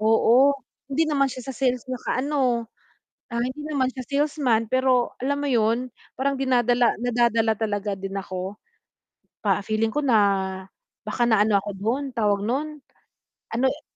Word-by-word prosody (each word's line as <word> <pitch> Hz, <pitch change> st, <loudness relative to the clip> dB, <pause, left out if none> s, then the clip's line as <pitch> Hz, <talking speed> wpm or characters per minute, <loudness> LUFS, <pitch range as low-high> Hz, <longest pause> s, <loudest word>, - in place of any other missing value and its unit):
oo, 230 Hz, +5 st, +5 dB, 0.4 s
hindi 315 Hz, +3 st, +2 dB
naman 280 Hz, -2 st, +2 dB
siya 255 Hz, 0 st, -9 dB
sa 265 Hz, -, -4 dB
sales 255 Hz, -1 st, 0 dB
nakaano, 255 Hz, -2 st, -1 dB, 0.7 s
ah, 235 Hz, -, 0 dB
hindi 260 Hz, +4 st, -3 dB
naman 280 Hz, -4 st, 0 dB
siya 260 Hz, -1 st, -7 dB
salesman, 280 Hz, -6 st, +1 dB
pero 255 Hz, -1 st, +2 dB
alam 280 Hz, +3 st, -1 dB
mo 285 Hz, -, -1 dB
'yun, 235 Hz, +1 st, +1 dB, 0.2 s
parang 275 Hz, +1 st, -1 dB
dinadala 245 Hz, -2 st, +3 dB
nadadala 230 Hz, -2 st, +2 dB
talaga 205 Hz, -2 st, -2 dB
din 195 Hz, 0 st, -6 dB
ako 190 Hz, 0 st, -4 dB, 0.9 s
pa 200 Hz, -1 st, +1 dB
feeling 220 Hz, +1 st, 0 dB
ko 295 Hz, +5 st, -2 dB
na 235 Hz, -5 st, +4 dB, 0.8 s
baka 215 Hz, +3 st, -2 dB
naano 215 Hz, -2 st, +4 dB
ako 205 Hz, +1 st, -3 dB
do'n 225 Hz, +8 st, -1 dB
tawag 205 Hz, -3 st, +1 dB
no'n, 300 Hz, +6 st, -2 dB, 0.8 s
ano 255 Hz, +3 st, +2 dB
e 285 Hz, +4 st, -1 dB
245 Hz, 145 wpm, -24 LUFS, 220-265 Hz, 0.9 s, oo